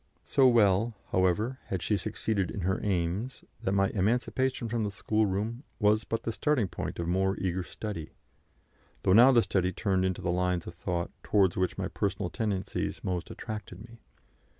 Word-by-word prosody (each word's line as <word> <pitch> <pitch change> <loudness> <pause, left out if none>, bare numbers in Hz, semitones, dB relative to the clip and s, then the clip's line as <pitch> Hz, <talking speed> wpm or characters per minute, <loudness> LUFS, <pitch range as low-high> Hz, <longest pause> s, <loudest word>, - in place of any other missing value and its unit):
So 135 -2 +4
well, 110 -1 +4 0.2
however, 95 +8 +1
had 95 -3 -3
she 105 - +1
succeeded 100 -1 -1
in 100 - -4
her 95 +2 0
aims, 95 +5 -1 0.2
that 95 - 0
my 100 0 +3
emancipation 120 +4 0
from 115 0 -1
the 105 - 0
schoolroom 105 +3 -1 0.2
was 105 0 +3
but 115 - -2
the 115 - -1
starting 130 -3 +1
point - - -5
of 85 - -3
more 95 +2 +1
eager 95 0 -1
study, 90 -2 -6 0.9
though 95 - +4
now 120 +6 +8
the 120 -3 +5
study 90 -1 +1
turned 95 0 0
into 95 -1 -1
the 85 - +1
lines 90 -1 0
of - - -7
thought 85 0 -3
towards 95 -4 +3
which 95 0 0
my - - -1
personal - - -2
tendencies 100 -4 -2
most 90 -2 -2
attracted 105 -5 -7
me. 115 +2 -13
100 Hz, 175 wpm, -29 LUFS, 95-110 Hz, 0.9 s, now